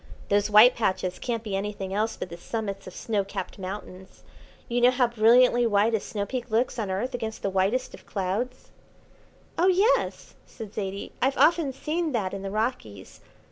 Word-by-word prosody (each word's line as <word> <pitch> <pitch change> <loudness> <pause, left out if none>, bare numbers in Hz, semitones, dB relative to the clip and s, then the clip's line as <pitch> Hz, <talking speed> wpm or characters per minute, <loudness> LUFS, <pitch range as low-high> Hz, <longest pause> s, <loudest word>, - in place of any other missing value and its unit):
"Those 205 +1 +2
white 215 +4 +8
patches 185 -4 -1
can't 230 -2 -3
be 205 -3 -3
anything 195 -1 -4
else 215 +3 0
but - - -5
the 170 - -7
summits 200 +1 -5
of 185 - -10
snow 210 -3 -1
capped 195 - -6
mountains. 190 -1 -8 0.4
You 240 0 0
know 245 - +7
how 255 0 +2
brilliantly 240 +1 +4
white 210 +1 +2
a 220 - +2
snow 200 0 -4
peak 245 +1 -5
looks 235 +2 0
on 210 -3 -2
earth 215 +8 -2
against 225 -2 -5
the 195 - 0
whitest 195 +7 0
of - - -13
clouds." 210 +7 -3 0.9
"Oh, 355 - +4
yes," 385 +6 +2
said 215 -3 -10
Zaidie, 195 -1 -4
"I've 270 +2 +1
often 325 -4 +4
seen 310 +4 -2
that 200 -5 -1
in 195 - -5
the 195 - -4
Rockies. 205 - -4
220 Hz, 180 wpm, -26 LUFS, 195-245 Hz, 0.9 s, white